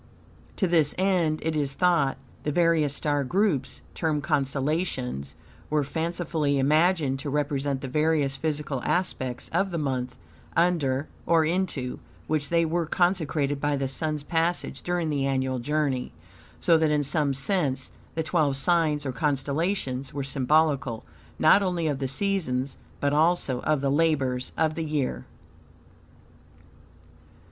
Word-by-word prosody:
To 190 - +1
this 160 -4 +3
end, 180 -5 +1
IT 160 0 -1
IS 140 -2 0
THOUGHT, 165 -5 +2 0.2
the 150 - -2
various 160 -3 +2
star 145 -2 0
groups, 165 -2 0
termed 155 -3 -1
constellations, 135 - -1 0.3
were 150 -1 +2
fancifully 160 -1 -1
imagined 150 0 +2
to 145 - -4
represent 140 -1 -1
the 135 - -4
various 150 0 +1
physical 145 -2 -2
aspects 130 -9 -2
of 195 0 +1
the 170 - -3
month, 130 -4 -2 0.4
under, 155 -5 +2 0.2
or 165 -2 +4
into, 160 -7 -1 0.3
which 150 -2 -1
they 170 -1 +3
were 165 0 -1
consecrated 155 -6 +1
by 145 -1 +1
the 135 -1 -1
Sun's 150 +2 -2
passage 165 +2 -1
during 175 -2 -1
the 140 -2 0
annual 130 -1 0
journey, 140 -1 -1 0.5
so 165 -2 +4
that, 160 -1 +3
in 150 -1 +2
some 145 -1 0
sense, 135 -3 0 0.2
the, 160 - 0
twelve 155 -4 +1
signs 155 -1 +2
or 135 - -1
constellations 140 +1 -1
were 140 - -2
symbolical, 135 -3 +1 0.3
not 200 - +6
only 180 -4 -1
of 145 -4 0
the 135 - -1
seasons, 135 -5 -1 0.2
but 145 0 +1
also 155 -5 +2
of 155 -3 +1
the 140 -1 +1
labors 140 -5 +1
of 160 -1 +2
the 165 - -3
year. 135 - -2
150 Hz, 140 wpm, -26 LUFS, 135-165 Hz, 0.5 s, not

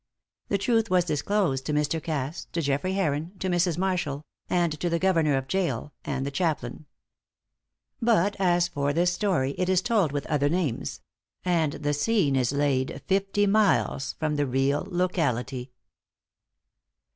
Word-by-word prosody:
The 200 - +2
truth 225 +2 +1
was 180 -1 +3
disclosed 155 -3 0
to 150 - -1
Mr. 150 +2 0
Cass, 150 0 -3
to 165 - 0
Geoffrey 145 +7 0
Heron, 165 -2 -1
to 190 - -3
Mrs. 175 -2 +1
Marshall, 175 -6 -1 0.2
and 175 -2 +2
to 175 - 0
the 170 - +1
Governor 165 -6 +2
of 135 0 -3
Gaol, 150 -7 -1
and 135 -1 -2
the 140 - -3
chaplain. 150 -4 -2 1.1
But 205 -4 +3
as 175 -2 +3
for 145 -3 -1
this 175 +3 +2
story 175 -9 0
it 180 0 +1
is 185 -1 +3
told 210 - +2
with 145 -1 -3
other 145 -2 +1
names; 165 -7 -2 0.4
and 165 -5 +1
the 145 0 -2
scene 150 -2 +2
is 125 -2 +1
laid 140 -2 0
fifty 195 +1 +1
miles 200 -9 +2
from 155 -1 -2
the 145 -1 +1
real 135 +6 0
locality. 140 -9 -1
160 Hz, 155 wpm, -26 LUFS, 140-185 Hz, 1.1 s, was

